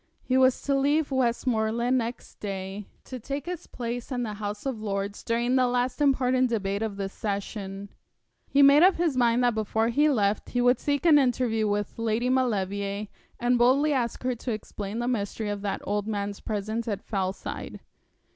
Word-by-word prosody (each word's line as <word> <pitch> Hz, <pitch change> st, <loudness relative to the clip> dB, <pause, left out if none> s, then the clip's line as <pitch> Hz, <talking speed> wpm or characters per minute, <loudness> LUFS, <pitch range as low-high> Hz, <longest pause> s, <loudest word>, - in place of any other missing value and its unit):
He 255 Hz, -, 0 dB
was 260 Hz, -1 st, +4 dB
to 280 Hz, -, 0 dB
leave 285 Hz, +2 st, +2 dB
Westmoreland 235 Hz, -1 st, +1 dB
next 240 Hz, -1 st, -4 dB
day 195 Hz, 0 st, -5 dB, 0.2 s
to 255 Hz, -, -7 dB
take 275 Hz, +5 st, -5 dB
his 355 Hz, -1 st, -6 dB
place 240 Hz, +1 st, -5 dB
in 245 Hz, -1 st, -1 dB
the 215 Hz, -2 st, -3 dB
House 205 Hz, +1 st, -5 dB
of 255 Hz, -5 st, -3 dB
Lords 200 Hz, -1 st, -3 dB
during 235 Hz, +2 st, 0 dB
the 255 Hz, -1 st, +4 dB
last 250 Hz, +3 st, -1 dB
important 255 Hz, -2 st, +3 dB
debate 200 Hz, -3 st, -1 dB
of 215 Hz, -3 st, -3 dB
the 195 Hz, -1 st, -2 dB
session. 200 Hz, 0 st, -5 dB, 0.6 s
He 280 Hz, 0 st, +5 dB
made 280 Hz, +2 st, +7 dB
up 370 Hz, +2 st, +6 dB
his 335 Hz, -5 st, 0 dB
mind 240 Hz, -1 st, +3 dB
that 245 Hz, -1 st, +3 dB
before 220 Hz, +1 st, 0 dB
he 295 Hz, +6 st, +3 dB
left 210 Hz, -6 st, +1 dB
he 245 Hz, -, -1 dB
would 245 Hz, +1 st, +4 dB
seek 285 Hz, +2 st, -1 dB
an 310 Hz, -3 st, +7 dB
interview 245 Hz, -4 st, +1 dB
with 205 Hz, +2 st, -2 dB
Lady 230 Hz, +2 st, 0 dB
Maulevrier, 200 Hz, -5 st, -1 dB, 0.3 s
and 245 Hz, 0 st, +2 dB
boldly 275 Hz, +5 st, +4 dB
ask 240 Hz, -3 st, -1 dB
her 255 Hz, 0 st, +1 dB
to 240 Hz, +1 st, -5 dB
explain 210 Hz, -1 st, -5 dB
the 240 Hz, +1 st, -1 dB
mystery 215 Hz, -2 st, -2 dB
of 205 Hz, -1 st, -3 dB
that 200 Hz, -1 st, -3 dB
old 205 Hz, 0 st, -2 dB
man's 205 Hz, -2 st, -3 dB
presence 220 Hz, +2 st, -3 dB
at 205 Hz, -2 st, -3 dB
Fellside. 190 Hz, -2 st, -4 dB
235 Hz, 185 wpm, -27 LUFS, 205-255 Hz, 0.6 s, made